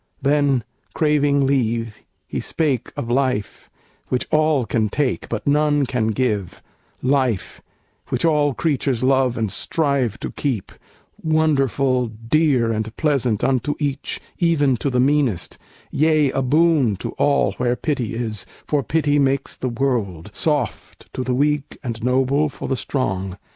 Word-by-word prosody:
Then, 140 -3 +2 0.3
craving 145 -2 +2
leave, 115 -5 0 0.3
he - - -3
spake 140 -7 -1
Of - - -3
life, 125 -4 -1 0.4
which 125 - -1
all 155 -4 +3
can 110 0 0
take, 140 +2 -1
but 115 -2 -3
none 145 0 +3
can 120 -3 -1
give, 110 -5 -1 0.4
Life, 130 -6 0 0.5
which - - 0
all 150 -4 +2
creatures 130 -2 0
love 130 -2 +2
and 110 -3 -1
strive 140 - 0
to - - -4
keep, 125 -10 -3 0.5
Wonderful, 140 -5 +2
dear 115 +2 +1
and 110 0 -3
pleasant 130 -9 +1
unto 135 +2 +1
each, 145 -2 -2 0.2
Even 145 -6 +3
to 140 - -1
the 125 -1 0
meanest; 130 - +1 0.3
yea, 155 -2 +3
a 135 - -1
boon 145 -4 +3
to - - -5
all 140 -1 +3
Where 125 0 +1
pity 130 -7 -2
is, 110 -3 -3 0.2
for 145 -2 +1
pity 145 +2 +1
makes 135 0 0
the 130 - -3
world 115 -8 -2
Soft 145 -8 -3
to 130 - -3
the 125 0 -1
weak 145 +1 0
and 115 -3 -5
noble 135 +4 +2
for - - -7
the 135 - 0
strong. 95 -6 -2
135 Hz, 145 wpm, -21 LUFS, 115-145 Hz, 0.5 s, all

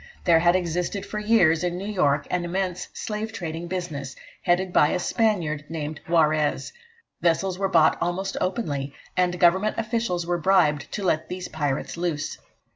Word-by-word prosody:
There 170 -3 +5
had 175 +1 +4
existed 180 +2 -1
for 210 - -4
years 180 -7 +3
in 175 0 -1
New 190 - -5
York 165 -9 +1
an 180 -1 0
immense 180 0 -2
slave 215 +1 -4
trading 165 -3 -5
business, 160 -7 -4 0.3
headed 180 +1 +1
by 150 - +5
a 180 - 0
Spaniard 175 -9 0
named 155 -2 -4
Juarez. 155 - +2 0.5
Vessels 180 +2 +1
were 195 -1 +1
bought 165 -4 +4
almost 180 +3 -2
openly, 145 - -2 0.2
and 180 -1 +1
Government 190 +5 +3
officials 225 -6 -1
were 175 0 -1
bribed 155 -5 +2
to 205 - -3
let 160 -4 0
these 180 0 -5
pirates 145 0 -2
loose. 165 -4 -2
175 Hz, 160 wpm, -25 LUFS, 155-190 Hz, 0.5 s, There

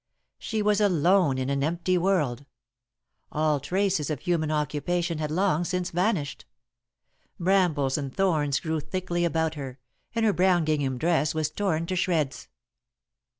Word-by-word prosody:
She 220 -2 -2
was 210 0 +2
alone 180 -5 +3
in 130 +1 -1
an 140 0 0
empty 170 +4 0
world. 155 -8 0 0.8
All 155 -1 +1
traces 185 +1 0
of 150 -3 -3
human 170 -4 0
occupation 155 +2 -1
had 155 -1 -2
long 175 0 +1
since 180 0 -2
vanished. 175 -5 -1 0.9
Brambles 170 -7 +2
and 140 -2 -4
thorns 150 -5 +1
grew 160 -1 -2
thickly 175 +2 -2
about 160 -1 0
her, 135 -4 -7 0.4
and 230 -1 +2
her 210 - +3
brown 180 -3 +3
gingham 145 -4 0
dress 160 +1 +1
was 155 -1 -1
torn 170 -4 -1
to 185 - -3
shreds. 160 -6 -1
165 Hz, 145 wpm, -26 LUFS, 150-185 Hz, 0.9 s, alone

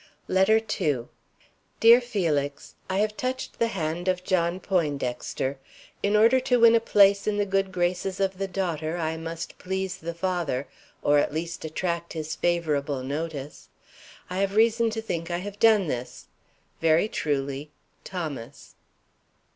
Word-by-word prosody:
LETTER 190 +4 +4 0.2
II. 130 -6 0 0.7
DEAR 235 +2 +8
FELIX: 160 - -2 0.2
I 190 - 0
have 210 +1 +1
touched 255 +2 -4
the 230 - +3
hand 175 -3 -3
of 185 -1 +1
John 180 -1 +1
Poindexter. 140 -6 -2 0.4
In 205 +1 +1
order 230 +5 +6
to 250 -1 +2
win 230 0 +8
a 230 - +6
place 200 -3 +4
in 210 -1 +1
the 205 - +1
good 195 -1 0
graces 180 +1 -1
of 195 -1 0
the 195 - -1
daughter 170 -4 -2
I 160 -1 -1
must 165 0 -6
please 190 0 -3
the 170 +1 -6
father, 170 -7 -1 0.4
or 145 0 +4
at - - +1
least 165 +2 -4
attract 170 +1 -3
his 160 -1 -4
favorable 150 -6 0
notice. 145 0 -5 0.6
I 180 +1 -4
have 200 0 0
reason 230 +1 +4
to 225 0 -4
think 170 -5 -3
I 175 - -1
have 200 +3 -7
done 220 -4 +5
this. 125 -5 -5 0.6
Very 165 +4 +4
truly, 140 -4 -2 0.3
THOMAS. 155 -11 -6
175 Hz, 150 wpm, -26 LUFS, 155-200 Hz, 0.7 s, DEAR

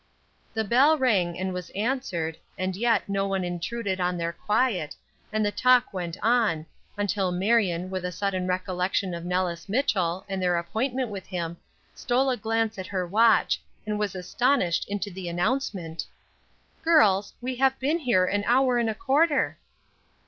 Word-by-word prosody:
The 220 - +1
bell 265 +9 +4
rang 195 - +1
and 190 0 -2
was 180 -1 -5
answered, 200 -8 -1 0.2
and 185 0 -2
yet 230 0 +1
no 195 0 0
one 195 -1 -1
intruded 185 +3 -3
on 180 0 0
their 170 0 -2
quiet, 210 - 0 0.4
and 215 0 +1
the 205 - +1
talk 250 0 +3
went 175 -2 -4
on, 220 -9 +2 0.3
until 205 -2 0
Marion, 185 -2 +1
with 185 -1 -3
a 180 - -2
sudden 185 -1 -2
recollection 185 0 -1
of 170 0 -6
Nellis 180 0 -2
Mitchell, 195 -7 0
and 195 -1 -3
their 180 -1 +2
appointment 240 +8 -2
with 195 -2 -7
him, 170 -2 -4 0.4
stole 260 +2 +1
a - - +1
glance 225 -1 -1
at 185 - -5
her 185 -2 -2
watch, 220 +4 +3 0.2
and 210 -1 -2
was 210 -2 -2
astonished 185 0 +1
into 205 0 -3
the 180 -1 -6
announcement: 175 - -2 0.7
"Girls, 210 - +4
we 255 0 -4
have 265 +1 +3
been 295 +6 0
here 240 - +3
an 205 +2 0
hour 250 0 +3
and 230 -1 +1
a 220 - -2
quarter!" 285 +2 +2
200 Hz, 165 wpm, -26 LUFS, 180-240 Hz, 0.7 s, bell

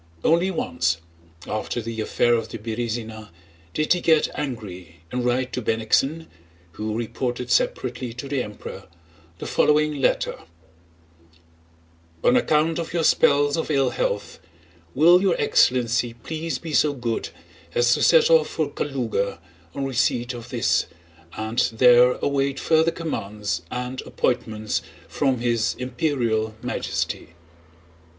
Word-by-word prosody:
Only 170 +3 +3
once, 85 - 0 0.5
after 110 +3 -3
the 115 -1 -4
affair 120 +2 +2
of 115 -1 0
the 115 - -6
Berëzina, 110 -1 -4 0.5
did 155 +2 +3
he 180 - -2
get 160 -2 +3
angry 90 - -6
and 125 0 -2
write 125 +1 0
to 125 - -2
Bennigsen 120 +8 +1 0.5
(who 110 +5 -4
reported 120 +1 -3
separately 125 0 0
to 125 +3 -7
the 135 -2 -1
Emperor) 105 -3 -8 0.5
the - - -7
following 150 0 +2
letter: - - +1 1.8
"On 125 - +4
account 155 +4 +2
of 165 - -5
your 170 -2 +1
spells 145 -1 +4
of 160 - -2
ill 135 -4 +2
health, - - -2 0.6
will 170 +6 +6
your 190 -3 +2
excellency 120 -1 +2
please 155 +4 -4
be 160 -2 -7
so 150 0 +3
good 120 -8 -3 0.5
as 120 0 +4
to - - 0
set - - +5
off 485 -1 +5
for 155 -3 -2
Kalúga 120 -8 -2 0.4
on 140 - -2
receipt 125 -1 0
of 120 0 -9
this, 120 -4 +1 0.5
and 110 +2 -2
there 125 +1 +6
await 140 -1 0
further 160 0 +3
commands 105 - -3
and 125 +1 -4
appointments 110 -3 -1 0.3
from 135 -4 0
His 115 -2 +1
Imperial 120 -4 -1
Majesty." 85 - -3
125 Hz, 130 wpm, -23 LUFS, 115-145 Hz, 1.8 s, will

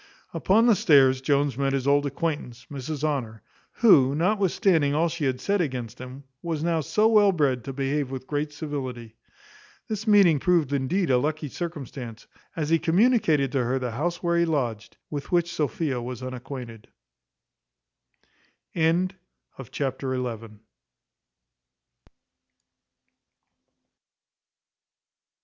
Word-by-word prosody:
Upon 220 +5 +3
the 240 - +6
stairs 140 - +4
Jones 140 -1 0
met 135 -1 +1
his 135 -2 -1
old 145 0 +3
acquaintance, 140 -5 -4
Mrs 145 +2 -5
Honour, 120 -8 -2 0.3
who, 140 - +5
notwithstanding 180 -4 +2
all 165 +2 +2
she 160 -2 -3
had 130 -1 -1
said 200 -1 0
against 125 -6 -4
him, 130 +2 -9 0.2
was 160 -3 -3
now 165 -1 +1
so 215 +8 +2
well 210 -3 +5
bred 140 -8 0
to 135 - -4
behave 135 +1 -2
with 130 -1 -6
great 150 +1 -2
civility. 130 -7 -6 0.7
This 215 0 -4
meeting 195 -8 +5
proved 165 -4 +1
indeed 140 +5 0
a 125 - +4
lucky 150 +2 -2
circumstance, 135 -8 -7 0.3
as 155 -2 -2
he 165 0 +3
communicated 165 - +2
to 135 -3 0
her 125 +2 0
the 125 -2 -3
house 170 +10 -3
where 170 0 +2
he 170 - +3
lodged, 120 -9 -3
with 145 -2 -5
which 170 -1 +1
Sophia 145 -3 -2
was 125 +1 -6
unacquainted. 125 -3 -8 1.9
Chapter 160 - -3 0.3
xii. 115 - -11
145 Hz, 125 wpm, -25 LUFS, 130-170 Hz, 1.9 s, the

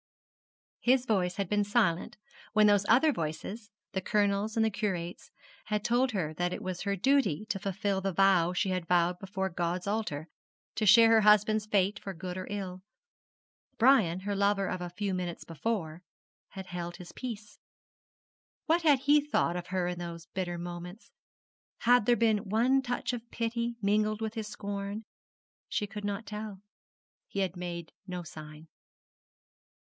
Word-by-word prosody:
His 255 +1 +3
voice 185 -6 +1
had 200 -2 -2
been 210 +2 +2
silent 205 -5 +1 0.4
when 215 -1 +5
those 205 -1 +4
other 270 +7 +6
voices 195 +7 -5 0.2
the 190 - -2
Colonel's 205 +1 +1
and 220 - +4
the 220 - +1
Curate's 190 -5 -3 0.4
had 210 -1 -1
told 245 +1 +2
her 160 -6 -1
that 175 +3 -1
it - - -5
was 185 -1 -4
her 200 0 0
duty 230 - +2
to 195 - -1
fulfil 195 0 -1
the 195 0 -1
vow 185 -2 +4
she 190 +2 0
had 180 -2 -2
vowed 175 0 +2
before 190 0 -3
God's 175 +1 -2
altar: 200 -8 -2 0.5
to 215 - -1
share 225 +2 +8
her 225 -1 +6
husband's 210 0 +4
fate 200 -1 +1
for 195 -1 -7
good 180 +2 -5
or 185 0 -5
ill. 190 -3 -5 1.0
Brian, 220 -8 +4
her 200 +1 -2
lover 200 0 +2
of 180 - -3
a 175 - -4
few 195 +2 -3
minutes 180 -2 -3
before, 165 0 -3 0.5
had 190 -1 -8
held 175 -1 -5
his 180 -2 -10
peace. 215 -4 -7 1.1
What 335 +2 +3
had 290 -5 +4
he 290 +2 +5
thought 285 - 0
of 175 0 -5
her 185 -1 -1
in 180 0 -3
those 170 -1 -6
bitter 175 -2 -2
moments? 175 +4 -8 0.7
Had 245 -2 +4
there 240 - +6
been 220 -3 +1
one 250 +6 +3
touch 245 -1 -2
of 235 -1 -6
pity 235 0 -2
mingled 210 +1 +2
with 220 -1 -3
his 220 -2 -4
scorn? 200 +1 -5 0.6
She 210 - -1
could 205 +1 -8
not 205 +1 -3
tell. 210 -2 -6 0.7
He 200 - -2
had 190 -1 -1
made 175 -2 -6 0.2
no 180 -1 -4
sign. 155 -1 -11
200 Hz, 165 wpm, -30 LUFS, 180-220 Hz, 1.1 s, share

